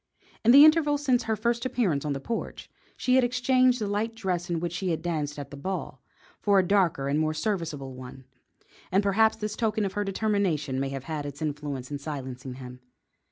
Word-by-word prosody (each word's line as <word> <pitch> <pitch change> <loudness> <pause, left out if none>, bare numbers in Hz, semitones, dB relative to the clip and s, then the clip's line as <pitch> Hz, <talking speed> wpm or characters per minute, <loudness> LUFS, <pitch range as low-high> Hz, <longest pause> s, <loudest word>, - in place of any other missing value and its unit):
In 225 - +3
the 280 +4 +10
interval 310 -2 +4
since 260 -5 +1
her 220 -1 0
first 235 +2 -1
appearance 220 - 0
on 145 - 0
the 135 - -4
porch, 230 +11 -5 0.3
she 255 - +1
had 260 0 +5
exchanged 250 0 +3
the 215 - -1
light 210 +3 -2
dress 180 -6 -2
in 170 -1 0
which 170 0 -3
she 185 +1 -2
had 160 -1 -2
danced 150 -4 -2
at 145 - -7
the - - -7
ball, 185 +7 -5 0.4
for 200 -1 +3
a 185 -2 +3
darker 175 -9 +2
and 145 +2 +1
more 155 0 0
serviceable 155 -7 -3
one, 130 +1 -10 0.7
and 195 +2 +3
perhaps 220 +3 +3
this 210 -1 -4
token 220 -2 0
of 195 - -3
her 205 - -1
determination 195 -9 0
may 135 0 -1
have 135 -1 -5
had 150 -1 -4
its 140 0 -8
influence 145 -4 -4
in 145 - -3
silencing 130 -3 -6
him. 125 -1 -10
180 Hz, 205 wpm, -27 LUFS, 145-220 Hz, 0.7 s, the